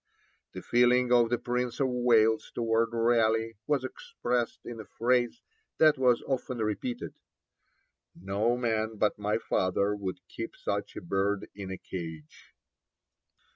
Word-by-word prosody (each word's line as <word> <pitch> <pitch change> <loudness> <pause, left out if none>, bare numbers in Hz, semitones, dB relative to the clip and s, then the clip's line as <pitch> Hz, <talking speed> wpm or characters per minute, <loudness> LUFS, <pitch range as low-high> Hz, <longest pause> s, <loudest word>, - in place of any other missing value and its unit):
The - - -7
feeling 125 +1 +3
of 120 -2 +5
the 120 - +1
Prince 125 0 -2
of 135 - +3
Wales 115 -3 +3
towards 115 -1 +1
Raleigh 115 -1 +2
was 145 -3 +1
expressed 130 - -3
in 120 -1 -7
a 110 - -7
phrase 120 - +1 0.3
that 155 -3 +5
was 125 -2 +3
often 130 -1 -2
repeated, 110 +2 -3 1.0
'No 100 +7 0
man 110 -2 -1
but 105 0 +1
my 105 +1 0
father 100 -1 0
would 95 -3 -5
keep 345 - -6
such - - -3
a - - -6
bird 100 - -1
in 100 -2 -7
a 95 - -4
cage.' 80 -5 -8
115 Hz, 135 wpm, -29 LUFS, 105-125 Hz, 1.0 s, of